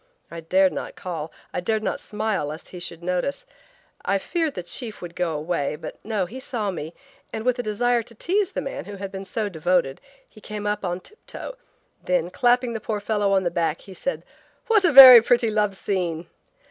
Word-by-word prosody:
I 170 - -6
dared 185 +3 +3
not - - -6
call. 165 -3 -5 0.2
I - - -1
dared 215 +4 -1
not - - -2
smile, 210 -7 -2
lest 155 +2 -8
he 180 - -9
should 170 -1 -7
notice. 180 - -2 0.6
I 200 - +1
feared 320 - -2
the 180 - -4
chief 220 +5 -6
would 170 -1 -9
go 170 -3 -1
away, 150 -1 -2
but 150 - -9
no, 210 -4 -1
he 240 +9 -9
saw 225 -6 -3
me, 165 -2 -7 0.4
and 220 - -5
with 250 0 +1
a - - +2
desire 240 +2 +1
to 230 +1 -10
tease 385 - 0
the - - -2
man 275 - -6
who 205 +1 -8
had 195 0 -6
been 195 0 -7
so 215 +2 -2
devoted 170 -5 0 0.3
he 215 - -18
came 210 -1 -6
up 210 0 -1
on 175 0 -3
tip 425 - -16
toe, - - -7 0.5
then, 180 -1 0
clapping 245 +1 +2
the 225 - -4
poor 215 -1 -3
fellow 205 -1 0
on 190 -1 +3
the 175 - 0
back, 165 -2 -1
he 195 - -12
said: 275 +9 -4 0.4
"What 445 -4 +3
a 345 - +4
very 260 -4 +12
pretty 240 -1 +2
love 210 -2 +1
scene!" 180 -4 -2
200 Hz, 210 wpm, -24 LUFS, 175-235 Hz, 0.6 s, very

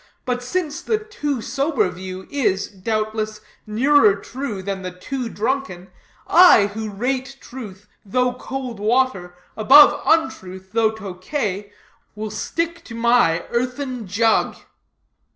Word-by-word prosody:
But 245 -1 -1
since 305 +3 -3
the 440 - 0
too 295 - -4
sober 275 -7 0
view 185 +1 -8
is, 210 -9 0
doubtless, 215 +2 -3 0.3
nearer 225 -1 +4
true 215 -1 -6
than 195 0 -4
the 185 - -4
too 240 +7 -5
drunken; 215 -7 -3 0.3
I, 350 - +7
who 215 +2 -5
rate 260 +6 -3
truth, 210 -7 -10 0.2
though 250 +5 0
cold 255 -3 -6
water, 210 -5 0 0.2
above 290 +6 +7
untruth, 190 - 0
though 225 0 +3
Tokay, 205 0 -4 0.4
will 215 0 -5
stick 335 +9 -3
to 230 - -9
my 230 -8 +3
earthen 250 -1 -3
jug." 220 +4 +2
225 Hz, 120 wpm, -21 LUFS, 200-270 Hz, 0.4 s, I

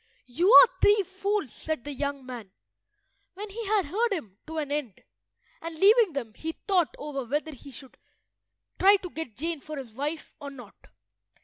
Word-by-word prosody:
"You 340 - +2
are - - +11
three 410 0 +5
fools," 390 - -2
said 315 -6 -4
the 290 - -6
young 280 -1 -4
man, 240 -6 -8 0.9
when 405 +2 -7
he 450 +1 -6
had 415 -3 +2
heard 440 +10 0
him 220 - -5
to 320 0 -6
an 295 -2 -3
end, 285 -9 -4 0.6
and 330 0 -6
leaving 410 +2 +5
them, 240 -6 -4
he 320 +7 -5
thought 360 -4 0
over 285 -2 -5
whether 295 +6 -2
he 280 +1 -12
should 270 0 -13 0.8
try 395 +2 +7
to 370 -3 -5
get 310 -10 -7
Jane 330 +1 -2
for 305 +2 -8
his 255 -5 -8
wife 295 +6 -4
or 285 -2 -7
not. 245 -7 -14
310 Hz, 180 wpm, -27 LUFS, 270-385 Hz, 0.9 s, are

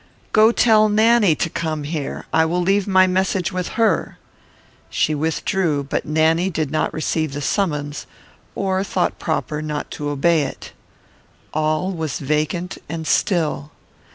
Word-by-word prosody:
"Go 220 +1 +6
tell 215 -3 +4
Nanny 215 -4 +4
to - - -1
come 160 -2 -3
here; 150 -1 -4
I 160 - +4
will 170 +2 0
leave 195 +3 +1
my 190 -1 +5
message 185 0 0
with 185 -1 -3
her." 230 -1 +1 0.7
She 155 - +1
withdrew, 160 0 0
but 140 - -3
Nanny 160 +4 +2
did 155 -5 -2
not 155 - 0
receive 155 -2 -2
the 145 - -4
summons, 145 -3 -2 0.5
or 190 -1 0
thought 185 -2 -1
proper 155 -2 -2
not 150 -1 -4
to 145 -1 -4
obey 155 +3 +2
it. 140 - -6 0.8
All 155 +4 0
was 160 -5 -3
vacant 155 +5 -2
and 160 -1 -4
still. 155 -5 0
160 Hz, 145 wpm, -20 LUFS, 155-190 Hz, 0.8 s, Go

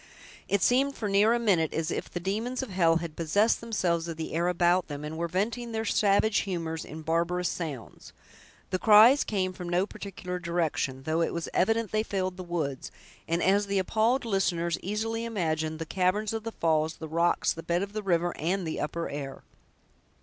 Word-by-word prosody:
It 200 -2 +2
seemed, 275 +3 +3
for 215 - -3
near 205 +2 +4
a 240 - +3
minute, 190 -9 +1
as 160 +1 -1
if - - -3
the 175 - -4
demons 220 +8 -2
of 245 - -7
hell 170 -3 +3
had 165 -2 -3
possessed 200 +7 +2
themselves 180 -7 -1
of 165 -2 -5
the 160 - -5
air 170 +2 +1
about 175 0 +2
them, 145 -1 -6
and 155 +1 -5
were 170 +1 -2
venting 225 +7 -2
their 220 0 -2
savage 210 +1 +3
humors 165 -4 -3
in 155 +1 -9
barbarous 170 +2 0
sounds. 145 - -6 0.6
The 185 - 0
cries 225 +7 +7
came 185 -3 -1
from 180 -1 -7
no 175 +2 +2
particular 185 -3 -6
direction, 165 -6 -1
though 160 +3 0
it 165 - 0
was 170 - -3
evident 225 +2 +1
they 215 - +2
filled 185 -4 -2
the 185 - -6
woods, 160 -6 -3 0.4
and, 170 +1 0
as 200 +2 +3
the 200 0 0
appalled 225 +7 +1
listeners 175 -5 0
easily 225 +3 -2
imagined, 160 -8 -1
the 165 - -5
caverns 195 +5 0
of 225 0 -4
the 225 - -3
falls, 160 -1 +1
the 160 - -7
rocks, 170 +2 +1
the 165 - -7
bed 170 +3 0
of 200 0 -7
the 215 - -3
river, 175 -3 0
and 180 +3 -1
the 160 - -3
upper 165 +3 -3
air. 140 -1 -6
180 Hz, 200 wpm, -28 LUFS, 165-210 Hz, 0.6 s, cries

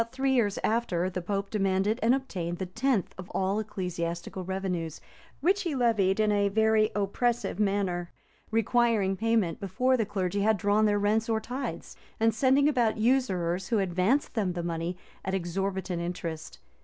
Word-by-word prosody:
About 230 +1 -5
three 265 0 +1
years 210 -6 +2
after, 190 -6 0
the 180 - -3
pope 195 +2 -3
demanded 195 +2 +1
and 235 +3 +4
obtained 180 -11 -4
the 190 - -3
tenth 225 +3 0
of 185 - -8
all 195 +2 +1
ecclesiastical 180 -3 -4
revenues, 180 -4 -3 0.4
which 380 +6 +3
he 340 -7 -2
levied 220 -6 +2
in 215 -1 +3
a 200 -1 +2
very 220 +1 +3
oppressive 210 +2 0
manner; 195 -4 0 0.4
requiring 225 -3 +2
payment 220 -5 +1
before 250 +7 +1
the 225 -4 +1
clergy 200 -1 -1
had 215 +1 +3
drawn 205 +3 +2
their 205 -1 +3
rents 215 +3 +1
or 220 -1 +2
tithes, 255 +5 -5 0.2
and 225 0 +3
sending 265 +5 +3
about 240 -7 +2
usurers, 190 -7 +1
who 230 - +1
advanced 195 +8 +1
them 200 -6 0
the 175 -1 -4
money 170 +1 -3 0.3
at 190 +1 -1
exorbitant 190 0 -2
interest. 170 -2 -5
205 Hz, 165 wpm, -28 LUFS, 185-230 Hz, 0.4 s, and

